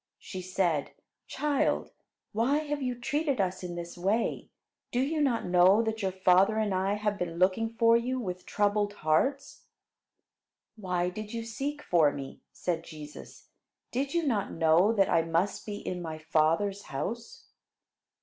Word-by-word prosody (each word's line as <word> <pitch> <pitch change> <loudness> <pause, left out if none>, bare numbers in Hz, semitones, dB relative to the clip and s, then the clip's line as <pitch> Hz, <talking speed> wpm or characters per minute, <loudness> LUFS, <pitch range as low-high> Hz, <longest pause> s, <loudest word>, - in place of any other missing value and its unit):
She 185 - -7
said: 180 -5 -1 0.3
"Child, 295 -2 0 0.4
why 240 +7 +2
have 295 -1 -2
you 250 -2 -2
treated 290 0 -1
us 185 -1 0
in 175 -1 -5
this 170 0 -6
way? 195 +6 -1 0.4
Do 245 - 0
you 300 +4 0
not 260 -5 +1
know 180 +4 +5
that 220 0 -2
your 190 -1 0
father 190 +3 +4
and 215 -3 +1
I 190 +2 +1
have 210 -1 -2
been 170 -1 -3
looking 190 +5 +2
for 230 0 +4
you 250 +2 0
with 185 -5 -5
troubled 205 0 +1
hearts?" 275 - 0 1.1
"Why 180 -4 -1
did 215 +4 -7
you 230 - -3
seek 275 +6 -4
for 160 -5 +4
me," 135 -2 -8
said 170 -2 -2
Jesus. 150 -3 -11 0.4
"Did 275 +5 -2
you 340 -2 +1
not 210 -8 0
know 165 +5 +4
that 200 -4 +3
I 165 - +3
must 165 +6 -1
be 210 - -3
in 180 -3 -5
my 160 -2 -5
Father's 160 +6 +1
house?" 225 +12 -6
200 Hz, 160 wpm, -29 LUFS, 175-235 Hz, 1.1 s, know